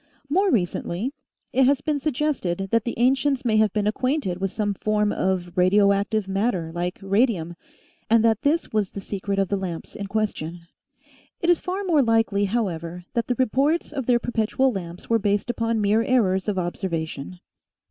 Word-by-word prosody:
More 385 +7 +3
recently 200 - -1 0.4
it 265 0 +4
has 280 -1 +3
been 300 -1 -1
suggested 265 - -1
that 230 -2 +2
the 235 - -3
ancients 265 +2 +2
may 220 -2 +3
have 215 -2 +4
been 210 0 -1
acquainted 220 - -1
with 195 - 0
some 205 +1 -1
form 210 +1 0
of 180 -2 -1
radio 200 +3 +4
active 200 +1 0
matter 195 -4 -1
like 175 +1 -3
radium, 195 -5 +1 0.5
and 230 0 +4
that 225 -1 +3
this 300 -1 0
was 210 -3 +1
the - - -7
secret 195 0 -3
of 195 -1 +1
the 200 - 0
lamps 180 -4 -6
in 200 -1 -5
question. 195 -5 -2 0.8
It 345 - +3
is 345 - +2
far 375 +3 -3
more 335 -6 +3
likely, 225 -4 +2
however, 180 -5 -2
that 235 - -1
the 245 - 0
reports 270 +7 +1
of 270 -5 -4
their 245 -1 +5
perpetual 240 +2 +1
lamps 180 -4 -7
were 230 0 +2
based 205 +3 0
upon 230 -1 -1
mere 210 +2 +3
errors 210 -6 +1
of 205 -2 -1
observation. 175 -2 -4
210 Hz, 180 wpm, -24 LUFS, 190-245 Hz, 0.8 s, their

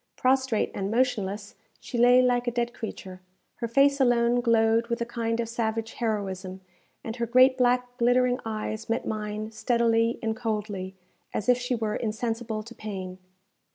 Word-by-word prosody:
Prostrate 260 -3 +1
and 195 0 -3
motionless, 210 -4 -1 0.3
she - - -8
lay 245 +1 +6
like 245 -1 +1
a - - +2
dead 240 0 -1
creature. 185 -4 -7 0.4
Her 235 - -3
face 275 +4 +3
alone 245 -1 +3
glowed 230 -1 +3
with 235 0 -2
a 235 - -1
kind 230 -1 -2
of 235 - -1
savage 225 -1 -2
heroism, 190 -4 -3 0.4
and 225 +1 -5
her 235 -1 -1
great 255 +2 +6
black 250 0 +1
glittering 245 +1 +3
eyes 220 0 -4
met 230 - -1
mine 215 0 -4
steadily 230 0 +1
and 220 0 -1
coldly, 210 -5 -3 0.4
as 205 - -2
if 250 0 +4
she 250 +1 -1
were 220 -2 -2
insensible 225 0 -3
to 230 +2 -11
pain. 190 -4 -7
230 Hz, 160 wpm, -26 LUFS, 215-245 Hz, 0.4 s, lay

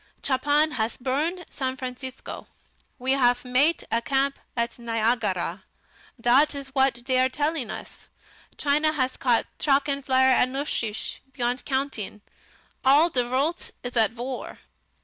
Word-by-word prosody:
Chapan 290 +3 +2
hass 220 +1 -1
burn 300 +8 -1
San 260 -1 -3
Francisco. 255 0 -7 0.5
We 260 +1 -1
haf 245 -2 +3
mate 270 +7 +3
a 230 - +2
camp 275 +2 0 0.2
at 235 +1 -1
Niagara. 220 -6 0 0.6
Dat 265 +6 +4
is 275 -1 -6
whad 265 -2 +2
they 260 -1 +2
are 260 0 +4
telling 290 -3 -1
us. - - -9 0.5
China 300 +2 +2
has 260 -3 0
cot 245 -3 +2
drachenflieger 280 -1 +1 0.3
and 255 +1 +1
luftschiffe 235 -6 -2
beyont 245 -1 -1
counting. 265 -7 -2 0.6
All 295 +6 +5
de 250 -4 +2
vorlt 270 +8 0
is 245 0 -5
at 220 -3 +4
vor!" 245 +2 -6
260 Hz, 130 wpm, -25 LUFS, 240-280 Hz, 0.6 s, All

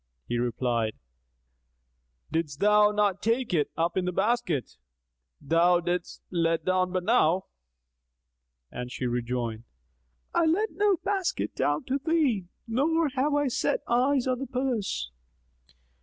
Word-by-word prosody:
He 120 0 -1
replied, 120 -2 0 1.4
"Didst 150 -4 -2
thou 210 0 +5
not 205 -2 +1
take 230 0 0
it 150 -4 +2
up 170 +1 0
in 185 -1 0
the 180 - 0
basket 210 - -1 0.6
thou 170 +2 +3
diddest 175 0 -3
let 165 -2 +1
down 185 0 +1
but 185 -1 -1
now?"; 190 -5 +3 1.3
and 125 0 -6
she 130 - -4
rejoined, 120 -2 -2 0.7
"I 330 - +3
let 410 +7 +1
no 410 -2 +2
basket 385 0 -2
down - - 0
to 270 +2 -1
thee, 280 - +1 0.2
nor 305 +7 +1
have 275 +3 0
I 290 -1 +2
set 250 - 0
eyes 255 +2 +2
on 255 -1 0
the 270 - -4
purse." 235 - -2
200 Hz, 130 wpm, -27 LUFS, 165-260 Hz, 1.4 s, thou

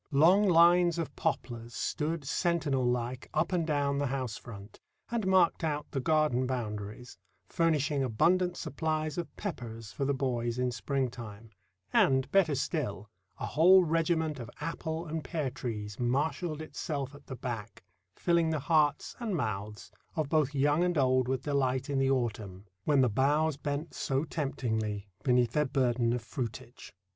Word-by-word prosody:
Long 180 +8 +5
lines 175 0 +5
of 160 -4 -4
poplars 120 -1 -3
stood 155 0 -2
sentinel 145 -6 +1
like 125 +1 -2
up 170 +3 +1
and 170 -2 +1
down 140 -2 +1
the 145 - 0
house 130 -4 -3
front, 105 -3 -11 0.3
and 230 -5 -1
marked 190 -3 +3
out 150 -2 -1
the 135 - -1
garden 150 -4 +2
boundaries, 110 -1 -5 0.3
furnishing 150 -4 +1
abundant 175 +9 +2
supplies 155 -1 -2
of 170 - -6
"peppers" 115 - -6
for 140 - -3
the 140 +1 +1
boys 120 -3 -1
in 125 0 0
spring 130 +1 -1
time; 110 -2 -10 0.4
and, 135 0 +3
better 175 -7 +4
still, 125 - -3 0.3
a - - -3
whole 180 +5 +6
regiment 160 -2 0
of 120 -1 -7
apple 160 +1 -4
and 160 -1 -4
pear 155 -6 -2
trees 105 -6 -5
marshalled 145 +6 -1
itself 145 -4 -4
at 145 0 -15
the 130 - -5
back, 115 -3 -6 0.3
filling 170 -2 +2
the 160 - 0
hearts 150 0 +1
(and 225 -6 -2
mouths) 105 -5 -4 0.2
of 155 -4 -1
both 150 -3 +1
young 145 +4 +3
and 175 -2 +1
old 130 -2 +3
with 130 0 -1
delight 135 -1 0
in 140 - +1
the 135 0 +2
autumn, 105 -7 -2 0.2
when 145 -3 +4
the 130 - +4
boughs 145 +6 +2
bent 145 +3 -4
so 135 +1 -1
temptingly 110 -9 -2
beneath 125 -2 +3
their 150 +3 +2
burden 125 -4 +1
of 120 -1 -2
fruitage. 125 0 -6
140 Hz, 160 wpm, -30 LUFS, 120-160 Hz, 0.4 s, whole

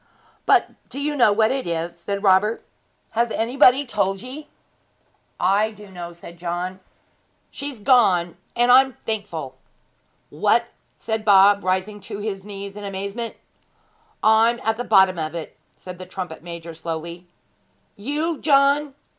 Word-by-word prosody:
'But - - +4 0.2
do 275 - -5
you 295 +1 -1
know 240 -6 +5
what 220 +1 +3
it 265 -5 -2
is?' 170 0 -3
said 200 +4 -5
Robert. 200 +3 +3 0.5
'Has 235 +1 +1
anybody 255 +4 +4
told 195 -5 -1
ye?' 270 +4 -9 0.9
'I 200 +4 +2
do 210 -1 -14
know,' 175 -2 -8
said 170 0 -13
John. 180 +2 -4 0.7
'She's 280 -4 -6
gone; 200 -7 +3 0.2
and 240 +1 +4
I 255 +1 +9
am 265 -1 -5
thankful!' 160 -12 -4 0.7
'What!' - - +2 0.3
said 220 -1 -3
Bob, 200 0 +6
rising 190 +3 -1
to - - -7
his 205 -2 -4
knees 200 -1 -8
in 210 - -8
amazement. 200 +4 -5 0.9
'I'm 225 +2 +4
at 225 0 0
the 245 - -3
bottom 190 -5 +4
of 155 +1 -3
it,' 165 -2 -6 0.2
said 180 -1 -10
the 185 - -9
trumpet 180 -3 -6
major 170 0 -8
slowly. 170 +2 -6 0.7
'You, 295 +9 -2
John?' 280 0 +3
200 Hz, 145 wpm, -22 LUFS, 180-235 Hz, 0.9 s, I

